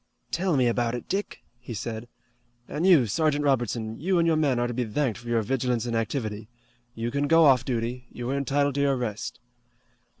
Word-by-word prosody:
"Tell 175 Hz, -3 st, +1 dB
me 130 Hz, -, +3 dB
about 120 Hz, 0 st, +1 dB
it, 120 Hz, -, -7 dB
Dick," 200 Hz, +2 st, -3 dB, 0.2 s
he 120 Hz, -1 st, -7 dB
said. 110 Hz, +3 st, -5 dB, 0.6 s
"And 165 Hz, +5 st, -1 dB
you, 165 Hz, -10 st, +6 dB
Sergeant 145 Hz, +6 st, +1 dB
Robertson, 120 Hz, -4 st, 0 dB
you 180 Hz, +5 st, +1 dB
and 170 Hz, -, +3 dB
your 165 Hz, -1 st, +3 dB
men 145 Hz, -5 st, +2 dB
are 120 Hz, -, +1 dB
to 120 Hz, -, -3 dB
be 125 Hz, +1 st, -1 dB
thanked 120 Hz, +1 st, -1 dB
for 120 Hz, -, -12 dB
your 115 Hz, -2 st, +2 dB
vigilance 125 Hz, 0 st, 0 dB
and 120 Hz, -1 st, -2 dB
activity. 110 Hz, -2 st, -3 dB, 0.5 s
You 115 Hz, +1 st, -3 dB
can 140 Hz, +2 st, 0 dB
go 165 Hz, +1 st, +6 dB
off 130 Hz, -3 st, +5 dB
duty. 125 Hz, 0 st, -3 dB
You 120 Hz, 0 st, -6 dB
are -, -, 0 dB
entitled 140 Hz, +1 st, +1 dB
to 140 Hz, -, 0 dB
your 140 Hz, -1 st, +3 dB
rest." 110 Hz, -4 st, -4 dB
125 Hz, 205 wpm, -26 LUFS, 115-145 Hz, 0.6 s, you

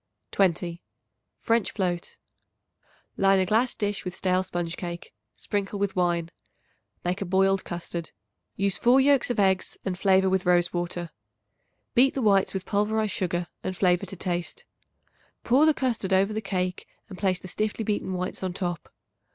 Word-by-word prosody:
20. 175 Hz, -2 st, +1 dB, 0.6 s
French 230 Hz, -2 st, +1 dB
Float. 180 Hz, -3 st, -2 dB, 1.0 s
Line 195 Hz, 0 st, +4 dB
a 190 Hz, -, +2 dB
glass 225 Hz, +6 st, +2 dB
dish 205 Hz, -1 st, -2 dB
with 180 Hz, -1 st, -5 dB
stale 185 Hz, -1 st, +1 dB
sponge 175 Hz, -2 st, -3 dB
cake. 175 Hz, -1 st, -7 dB, 0.2 s
Sprinkle 200 Hz, 0 st, -3 dB
with 200 Hz, -1 st, -1 dB
wine. 175 Hz, -2 st, 0 dB, 0.7 s
Make 180 Hz, +2 st, -1 dB
a -, -, -1 dB
boiled 195 Hz, +1 st, +2 dB
custard. 170 Hz, -1 st, -5 dB, 0.5 s
Use 195 Hz, -1 st, 0 dB
4 245 Hz, +2 st, +5 dB
yolks 275 Hz, -1 st, +4 dB
of 245 Hz, -, -1 dB
eggs 190 Hz, -2 st, +2 dB
and 190 Hz, -2 st, -1 dB
flavor 190 Hz, -1 st, +4 dB
with 190 Hz, -1 st, +1 dB
rose 175 Hz, -1 st, +3 dB
water. 175 Hz, -1 st, -3 dB, 0.8 s
Beat 265 Hz, +3 st, +4 dB
the 270 Hz, -, -1 dB
whites 200 Hz, -3 st, +4 dB
with 190 Hz, -1 st, -4 dB
pulverized 215 Hz, 0 st, 0 dB
sugar 175 Hz, -4 st, -1 dB, 0.2 s
and 185 Hz, -1 st, -3 dB
flavor 180 Hz, -2 st, +2 dB
to -, -, -8 dB
taste. 175 Hz, -, -4 dB, 0.8 s
Pour 270 Hz, +6 st, +4 dB
the 315 Hz, -, +5 dB
custard 235 Hz, -7 st, -1 dB
over 195 Hz, +3 st, +3 dB
the 220 Hz, -, -2 dB
cake 185 Hz, -2 st, -3 dB, 0.2 s
and 200 Hz, -, -9 dB
place 190 Hz, -2 st, +1 dB
the 185 Hz, -, -10 dB
stiffly 215 Hz, +4 st, -2 dB
beaten 205 Hz, -3 st, -2 dB
whites 180 Hz, 0 st, -3 dB
on 185 Hz, -2 st, -2 dB
top. 175 Hz, -3 st, -4 dB
190 Hz, 160 wpm, -26 LUFS, 180-205 Hz, 1.0 s, 4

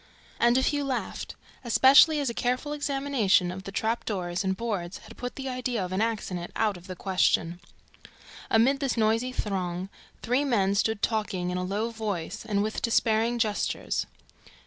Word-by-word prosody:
And 240 Hz, +1 st, +4 dB
a 260 Hz, -, +2 dB
few 290 Hz, +1 st, +1 dB
laughed, 265 Hz, -3 st, -4 dB, 0.3 s
especially 275 Hz, +6 st, +6 dB
as 285 Hz, -, -1 dB
a 235 Hz, -, -1 dB
careful 255 Hz, +5 st, -1 dB
examination 270 Hz, -11 st, +1 dB
of 190 Hz, +1 st, -8 dB
the 195 Hz, -, -6 dB
trap 220 Hz, +4 st, -1 dB
doors 180 Hz, -3 st, -2 dB
and 190 Hz, 0 st, -1 dB
boards 200 Hz, -6 st, -3 dB
had -, -, -14 dB
put 245 Hz, 0 st, -6 dB
the 270 Hz, -1 st, -5 dB
idea 250 Hz, -5 st, -2 dB
of 180 Hz, -, -7 dB
an 190 Hz, +2 st, 0 dB
accident 200 Hz, -6 st, -2 dB
out 215 Hz, -2 st, +1 dB
of 175 Hz, +1 st, -12 dB
the 185 Hz, -, -6 dB
question. 175 Hz, -2 st, +1 dB, 0.9 s
Amid 260 Hz, +5 st, +4 dB
this 270 Hz, -4 st, -1 dB
noisy 225 Hz, +3 st, +2 dB
throng, 185 Hz, -5 st, -3 dB, 0.3 s
three 250 Hz, +4 st, +1 dB
men 205 Hz, -8 st, +2 dB
stood 215 Hz, +1 st, 0 dB
talking 195 Hz, -5 st, -1 dB
in 180 Hz, -, -2 dB
a -, -, -2 dB
low 205 Hz, +5 st, -2 dB
voice 210 Hz, -7 st, -4 dB
and 205 Hz, -2 st, 0 dB
with 215 Hz, +1 st, -3 dB
despairing 230 Hz, 0 st, +2 dB
gestures. 215 Hz, -3 st, -1 dB
220 Hz, 170 wpm, -27 LUFS, 190-250 Hz, 0.9 s, especially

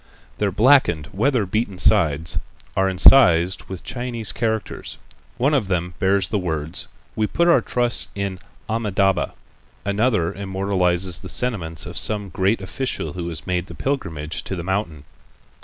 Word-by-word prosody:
Their 105 Hz, -2 st, +1 dB
blackened, 105 Hz, -, +3 dB
weather 115 Hz, +1 st, +1 dB
beaten 100 Hz, 0 st, -2 dB
sides 80 Hz, -1 st, +2 dB, 0.4 s
are 95 Hz, 0 st, +2 dB
incised 95 Hz, -3 st, +5 dB
with 95 Hz, -2 st, -8 dB
Chinese 120 Hz, -3 st, -1 dB
characters. 110 Hz, -2 st, -3 dB, 0.4 s
One 140 Hz, +5 st, +2 dB
of 130 Hz, -9 st, +1 dB
them 90 Hz, -1 st, -1 dB
bears 95 Hz, +1 st, +2 dB
the 105 Hz, -, 0 dB
words: 80 Hz, -3 st, -3 dB, 0.3 s
"We 110 Hz, -1 st, +1 dB
put 170 Hz, +8 st, +1 dB
our 170 Hz, -, +5 dB
trust 120 Hz, -1 st, 0 dB
in 100 Hz, -2 st, -3 dB, 0.3 s
Amitâbha." 100 Hz, -4 st, 0 dB, 0.5 s
Another 100 Hz, -4 st, +1 dB
immortalizes 95 Hz, -3 st, 0 dB
the -, -, -8 dB
sentiments 90 Hz, -11 st, -1 dB
of -, -, 0 dB
some 105 Hz, -2 st, 0 dB
great 95 Hz, +5 st, 0 dB
official 125 Hz, +2 st, -3 dB
who 85 Hz, -1 st, -4 dB
has 80 Hz, -4 st, -7 dB
made 90 Hz, 0 st, -2 dB
the -, -, -10 dB
pilgrimage 80 Hz, -, -3 dB
to 95 Hz, -, -4 dB
the 85 Hz, -, -5 dB
mountain. 90 Hz, -6 st, -2 dB
95 Hz, 145 wpm, -22 LUFS, 90-110 Hz, 0.5 s, incised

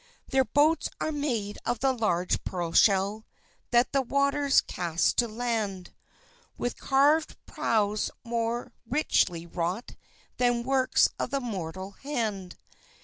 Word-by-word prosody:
Their 265 Hz, -1 st, +3 dB
boats 305 Hz, +5 st, +2 dB
are 315 Hz, -, -1 dB
made 240 Hz, -9 st, -2 dB
of 240 Hz, -, -1 dB
the 270 Hz, 0 st, +3 dB
large 195 Hz, -7 st, 0 dB
pearl 175 Hz, -3 st, -3 dB
shell 200 Hz, +3 st, +3 dB, 0.5 s
That 240 Hz, +1 st, +3 dB
the 275 Hz, -, +3 dB
waters 280 Hz, +2 st, +2 dB
cast 170 Hz, -1 st, 0 dB
to 240 Hz, -, +3 dB
land; 215 Hz, -5 st, -3 dB, 0.6 s
With 245 Hz, -, -2 dB
carvèd 290 Hz, +4 st, +2 dB
prows 210 Hz, -2 st, 0 dB
more 235 Hz, 0 st, -2 dB, 0.2 s
richly 175 Hz, -, +1 dB
wrought 175 Hz, +6 st, -3 dB, 0.4 s
Than 245 Hz, -1 st, +2 dB
works 260 Hz, 0 st, +3 dB
of 275 Hz, -, -1 dB
mortal 190 Hz, -3 st, -5 dB
hand. 215 Hz, -8 st, -4 dB
235 Hz, 120 wpm, -28 LUFS, 195-270 Hz, 0.6 s, Their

